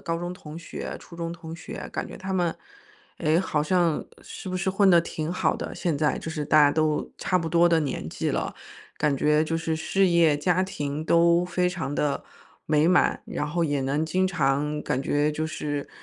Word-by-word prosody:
高 165 -1 -2
中 175 +1 -4
同 160 -4 -9
学、 170 - -6
初 170 - -14
中 170 0 -4
同 165 -1 -8
学， 165 - -8
感 - - -3
觉 - - -9
他 190 0 -5
们， 175 -3 +1 0.7
哎， 160 0 +2
好 155 -5 0
像 170 -1 +1 0.2
是 - - -8
不 185 - -2
是 190 +1 -1
混 195 0 +4
得 170 - +7
挺 160 0 -4
好 180 - +1
的， - - -5
现 170 -5 -1
在 150 0 +1
就 - - -6
是 150 -2 -3
大 155 +1 +4
家 145 -1 +6
都 155 -1 0
差 185 - +1
不 165 - -3
多 170 +1 +4
的 165 -1 +4
年 135 - -3
纪 - - -2
了。 - - -2 0.4
感 150 -2 +1
觉 150 +3 +3
就 165 +1 -1
是 165 -1 -1
事 190 +4 +2
业、 165 -4 +4
家 180 +4 +1
庭 155 -5 -3
都 170 +1 +4
非 180 0 0
常 160 -5 -4
地 145 -1 -1 0.4
美 155 +2 +3
满。 180 - +3
然 150 - -3
后 170 +3 -1
也 145 -3 0
能 140 +4 0
经 185 +4 +1
常 150 -3 0
感 130 - -1
觉 145 +2 +1
就 155 +1 -2
是， 145 -2 -4
160 Hz, 230 characters per minute, -26 LUFS, 150-175 Hz, 0.7 s, 得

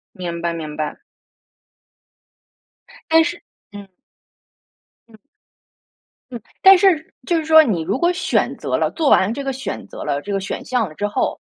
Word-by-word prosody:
明 170 -3 -5
白， 170 0 -1
明 155 -2 -6
白。 155 -1 -4 2.1
但 325 0 +6
是， 340 - -4 0.3
嗯。 205 -1 -11 1.2
嗯。 220 - -17 1.1
嗯， 240 - -6 0.2
但 385 0 +8
是 355 -5 +2
就 345 - 0
是 320 - -2
说 315 0 +7
你 205 - -1
如 160 - -2
果 345 +5 +1
选 365 +1 -1
择 - - -2
了 - - 0
做 315 -4 0
完 195 +4 +3
这 280 +3 -5
个 270 - -2
选 265 0 -6
择 - - -9
了 140 0 -2
这 205 - -7
个 195 - 0
选 195 - -5
项 245 -4 -1
了 155 - -12
之 205 +6 -2
后， 205 - -2
230 Hz, 175 characters per minute, -19 LUFS, -, 2.1 s, 但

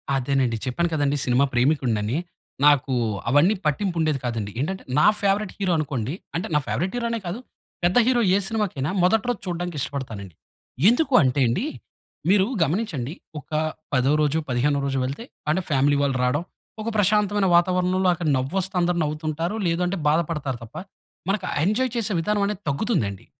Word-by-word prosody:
అదేనండి. 130 -3 +1
చెప్పాను 170 +7 0
కదండీ 145 -2 +1
సినిమా 125 +2 +3
ప్రేమికుడినని. 120 -3 +1 0.5
నాకూ, 145 -2 +4 0.4
అవన్నీ 145 - +4
పట్టింపు 170 +5 0
ఉండేది 155 -3 +1
కాదండి. 115 -4 -3
ఏంటంటే, 190 +7 -3 0.2
నా - - +5
ఫేవరైట్ 200 0 0
హీరో 190 -2 0
అనుకోండి 140 -4 -2 0.2
అంటే 175 - -2
నా 150 - +5
ఫేవరైట్ 185 - -2
హీరో 235 - -1
అనే 230 - -1
కాదు, 180 +7 -4 0.4
పెద్ద 180 +7 +3
హీరో 250 -2 +3
ఏ - - +4
సినిమాకైనా, 205 -11 -1
మొదటి 210 +4 +3
రోజు 240 -5 -1
చూడడానికి 175 -2 -3
ఇష్టపడతానండి. 110 - -5 0.5
ఎందుకంటేండి, 145 - +3 0.6
మీరు 195 0 +5 0.2
గమనించండి 155 - -2 0.3
ఒక 145 - -17 0.4
పదో 130 +1 +3
రోజు, 150 +1 +2
పదిహేనో 140 +4 +1
రోజు 135 -1 -1
వెళ్తే, 140 - -5 0.3
అంటే 180 +5 +2
ఫ్యామిలీ 140 0 +3
వాళ్ళు 140 -2 +1
రావడం, 145 +6 +1 0.4
ఒక 220 - -2
ప్రశాంతమైన 205 0 +2
వాతావరణంలో 180 +1 +2
అక్కడ 170 -1 -3
నవ్వు 130 +8 -3
వస్తే 190 +1 -4
అందరు 175 0 +1
నవ్వుతుంటారు, 155 +4 -2
లేదంటే, 180 +3 0
బాధ 150 +2 +4
పడతారు 140 -6 -3
తప్ప, 115 - -13 0.5
మనకు 195 -1 0
ఆ - - -2
ఎంజాయ్ 235 +6 +1
చేసే 225 -3 -1
విధానం 205 +4 0
అనేది 205 -1 -3
తగ్గుతుందండి. 140 - -1
160 Hz, 155 wpm, -24 LUFS, 135-190 Hz, 0.6 s, నా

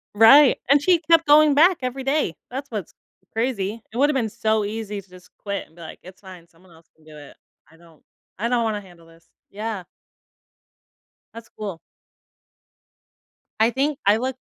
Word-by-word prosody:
Right, 260 +6 +7
and 280 +1 +5
she 350 +1 +3
kept 330 -1 +5
going 295 0 +5
back 345 +4 +5
every 255 +1 -4
day, 270 - -1 0.2
that's 270 +2 -6
what's 210 -7 -6 0.4
crazy. 225 -2 -3
It 230 - -8
would've 290 +3 +3
been 235 -5 -1
so 220 -1 -1
easy 210 -1 -5
to 190 - -27
just 180 0 -17
quit 200 -1 -5
and 160 - -27
be 170 - -15
like, 160 - -10
"It's 185 +2 -15
fine, 185 -3 -13
someone 170 +1 -24
else 165 0 -21
can 160 - -27
do 155 -1 -15
it. 145 -1 -14 0.3
I 165 - -21
don't 165 -2 -22 0.3
I 225 - -2
don't 240 -1 0
wanna 215 -2 -2
handle 175 -3 -18
this." 165 0 -22 0.2
Yeah. 210 -2 -5 1.5
That's 230 0 -12
cool. 200 -6 -6 1.8
I 225 - +4
think 280 +3 -1
I 205 +2 +4
look 260 +2 -3
220 Hz, 180 wpm, -22 LUFS, 180-265 Hz, 1.8 s, Right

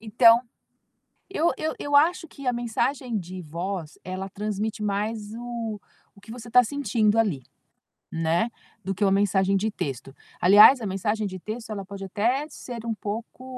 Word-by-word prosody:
Então, 230 +1 +6 0.9
eu 340 -3 +1
eu 315 0 -2
eu 285 - -3
acho 330 +4 +3
que 280 -3 -11
a - - +3
mensagem 240 +1 -1
de 185 0 -7
voz 170 +1 -5
ela 185 +1 -5
transmite 210 +1 -3
mais 210 +1 -2
o 230 -3 -5 0.4
o 200 - -17
que 220 - -11
você 240 -1 -9
está 250 +1 +6
sentindo 230 -5 +1
ali, 190 - +1 0.7
né, 165 +7 +1 0.3
do 195 - -2
que 200 +3 0
uma 195 - +3
mensagem 195 -1 +2
de 215 +3 0
texto. 135 - -5 0.3
Aliás, 205 +8 +8
a 220 - -4
mensagem 210 +3 -1
de 185 - -6
texto 220 +4 -7
ela 200 -2 -4
pode 195 0 -8
até 235 +9 0
ser 240 -5 -8
um 230 - -1
pouco 220 +4 -6
215 Hz, 170 wpm, -25 LUFS, 195-235 Hz, 0.9 s, Aliás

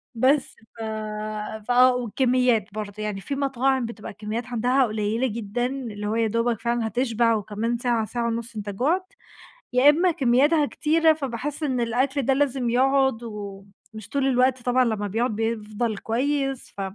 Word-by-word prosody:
بس 260 +4 +2 0.2
ف - - -8 0.9
ف 245 - 0
آه، 250 +1 +6
والكميّات 245 -3 +1
برضه 210 -1 -5
يعني 205 -2 -3
في 275 - -4
مطاعم 270 -2 +1
بتبقى 225 -2 -7
الكميّات 215 +4 -5
عندها 250 +2 +2
قليّلة 215 +3 -1
جدًا، 230 +1 -3
اللي 235 -6 -4
هو 215 - -1
يادوبك 230 0 0
فعلًا 235 -1 0
هتشبع 230 0 +1
وكمان 220 +3 -2
ساعة 235 -2 0
ساعة 235 +1 -2
ونُصّ 230 0 -3
أنت 210 -1 -5
جُعت، 330 - -1 0.6
يا 255 +3 +6
إمّا 345 +5 +4
كميّاتها 290 +3 +3
كتيرة 320 +2 +3
فباحس 285 +1 -4
إن 260 -4 0
الأكل 260 +4 0
ده 270 +1 +2
لازم 265 -3 0
يقعد، 265 -1 +2
ومش 205 0 -9
طول 275 -1 +1
الوقت 255 0 +2
طبعًا 250 +1 +2
لمّا 215 -3 -1
بيقعد 225 +3 -1
بيفضل 220 0 -2
كويس، 270 +4 -1
ف - - -3
240 Hz, 155 wpm, -24 LUFS, 220-265 Hz, 0.9 s, آه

